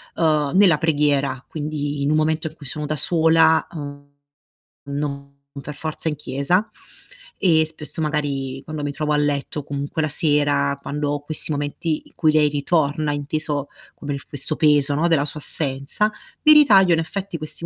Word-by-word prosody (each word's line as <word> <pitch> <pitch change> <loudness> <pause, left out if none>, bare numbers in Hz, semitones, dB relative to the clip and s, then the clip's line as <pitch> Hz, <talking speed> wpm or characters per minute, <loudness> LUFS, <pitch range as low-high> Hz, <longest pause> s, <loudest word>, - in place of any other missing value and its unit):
uhm, 150 -3 +1
nella 185 -6 +6
preghiera, 145 -4 +1
quindi 145 -2 -4
in 145 - +1
un 155 - +3
momento 155 +1 0
in 155 - -10
cui 145 - -13
sono 150 +3 -5
da 155 +1 -2
sola, 160 0 +4
uhm, 145 -3 -8 0.8
non 140 -1 -5 0.3
per 150 +1 -8
forza 155 +2 -3
in 150 - -3
chiesa, 145 +9 -1 0.7
e 160 -4 +3
spesso 155 0 -3
magari 140 -3 -2
quando 155 -1 -6
mi 145 - -2
trovo 150 0 -2
a - - +2
letto 145 0 -1
comunque 145 +3 -3
la 155 - 0
sera, 145 -2 +1
quando 145 0 -3
ho 145 - -1
questi 155 +1 0
momenti 145 +2 -2
in - - -21
cui 155 -2 +3
lei 150 -1 +4
ritorna, 150 0 0
inteso 145 0 -3 0.3
come 145 -1 -5
il 140 - -7
questo 145 +2 -2
peso, 145 -2 +3
no, 165 +3 +2
della 145 -3 +2
sua 150 0 -5
assenza. 140 +10 -1 0.3
Mi 305 - +8
ritaglio 200 - +6
in 165 - +2
effetti 185 +1 -4
questi 155 +2 -6
150 Hz, 175 wpm, -21 LUFS, 145-160 Hz, 0.8 s, Mi